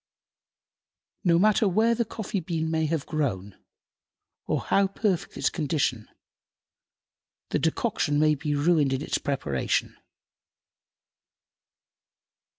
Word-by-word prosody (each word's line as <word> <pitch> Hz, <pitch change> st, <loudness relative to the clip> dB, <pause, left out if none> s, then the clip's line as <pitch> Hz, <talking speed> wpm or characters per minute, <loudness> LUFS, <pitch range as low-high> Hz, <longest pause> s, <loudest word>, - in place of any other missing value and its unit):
No 170 Hz, -2 st, +4 dB
matter 210 Hz, +3 st, +4 dB
where 220 Hz, +5 st, +3 dB
the 235 Hz, 0 st, 0 dB
coffee 215 Hz, -2 st, -4 dB
bean 160 Hz, -2 st, -2 dB
may 160 Hz, -1 st, +1 dB
have 155 Hz, -2 st, -2 dB
grown 105 Hz, -11 st, -2 dB, 0.9 s
or -, -, 0 dB
how 195 Hz, 0 st, +2 dB
perfect 195 Hz, -2 st, -2 dB
its -, -, +1 dB
condition, 140 Hz, -8 st, -1 dB, 1.4 s
the -, -, +1 dB
decoction 145 Hz, 0 st, 0 dB
may 155 Hz, 0 st, +4 dB
be 150 Hz, 0 st, -2 dB
ruined 145 Hz, -2 st, +2 dB
in 135 Hz, +2 st, -2 dB
its -, -, -1 dB
preparation. 70 Hz, -, -1 dB
160 Hz, 105 wpm, -26 LUFS, 145-190 Hz, 1.4 s, No